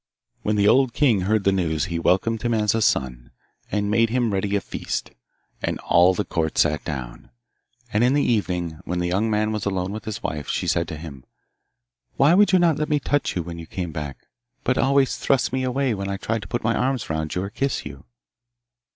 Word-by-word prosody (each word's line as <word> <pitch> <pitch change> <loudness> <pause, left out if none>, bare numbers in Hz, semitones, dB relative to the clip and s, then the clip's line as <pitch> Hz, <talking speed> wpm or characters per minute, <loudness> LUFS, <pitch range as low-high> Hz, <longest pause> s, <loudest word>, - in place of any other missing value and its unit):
When 105 - 0
the 100 -1 +3
old 130 +1 +4
king 120 -10 +3
heard 105 +2 +1
the 100 - +3
news 80 -6 0
he 85 -1 -3
welcomed 105 +6 +1
him 120 -1 0
as 105 -2 +2
a 115 - 0
son, 60 - 0 0.4
and 105 0 0
made 115 +1 +3
ready 105 -5 0
a - - +3
feast, - - -4 0.5
and - - -1
all 90 +2 +4
the 105 - -1
court 80 -2 -2
sat 75 0 +2
down. 65 -6 -6 0.6
And 105 +3 +3
in 125 +3 +3
the 145 - +3
evening, 90 -8 -1
when 90 - -3
the 90 0 0
young 100 +5 +1
man 105 0 +1
was 105 -2 -3
alone 95 -1 -1
with 105 0 -6
his 110 -2 -5
wife, 75 -2 -3
she - - -1
said 85 -1 +1
to 80 - -6
him, 75 -5 -9 0.9
'Why 145 +5 +5
would 205 +3 +5
you 190 - +6
not 170 -4 +3
let 150 - -1
me 150 -1 +2
touch 145 0 -1
you 90 - -1
when 85 0 -7
you 85 - -9
came 90 -5 -4
back, 75 -3 -6 0.4
but 130 - +1
always 135 0 +2
thrust 135 -2 +1
me 130 - 0
away 130 0 0
when 100 -1 -4
I 100 - -2
tried 110 +2 -2
to 95 - -9
put 120 +6 -3
my 110 +1 +2
arms 130 -1 -1
round 80 -1 -2
you 90 - -1
or 100 - -5
kiss 135 +4 -2
you? - - -9
105 Hz, 220 wpm, -23 LUFS, 85-120 Hz, 0.9 s, you